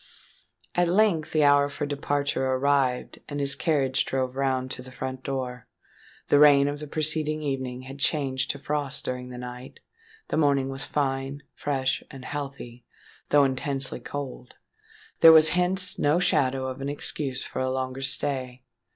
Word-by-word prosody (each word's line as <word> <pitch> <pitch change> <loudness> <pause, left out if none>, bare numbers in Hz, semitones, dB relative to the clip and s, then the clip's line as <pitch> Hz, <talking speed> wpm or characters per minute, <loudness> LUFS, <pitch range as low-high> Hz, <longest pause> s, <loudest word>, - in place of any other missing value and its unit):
At 175 0 +2
length 175 -4 +2
the 155 -1 +3
hour 145 0 +5
for 145 - -4
departure 145 -1 -1
arrived; 130 -1 +1
and 145 -1 -4
his 140 -1 +4
carriage 135 -3 +1
drove 130 -1 -2
round 130 -1 -1
to - - -5
the 130 - -11
front 130 +1 -6
door. 130 -3 -4 0.6
The 145 - +5
rain 140 -1 +7
of 145 0 -3
the 150 - -7
preceding 155 0 0
evening 130 -3 -3
had 135 +2 -10
changed 135 -3 0
to - - -1
frost 145 -1 -3
during 125 0 -4
the 125 - -8
night;—the 155 - -9
morning 140 -3 +2
was 135 0 -5
fine, 135 0 -2
fresh, 135 -2 -1
and 135 -3 -10
healthy, 135 -4 -6 0.5
though 145 -1 +5
intensely 135 0 -1
cold; 135 -3 -7 0.6
there 165 - +10
was 160 -1 +8
hence 180 +2 +1
no 145 +3 +3
shadow 135 -6 +1
of 130 +1 -5
an 140 - -3
excuse 145 -2 -2
for - - -6
a 130 0 0
longer 130 0 -3
stay. 130 -2 -2
140 Hz, 160 wpm, -26 LUFS, 130-145 Hz, 0.6 s, there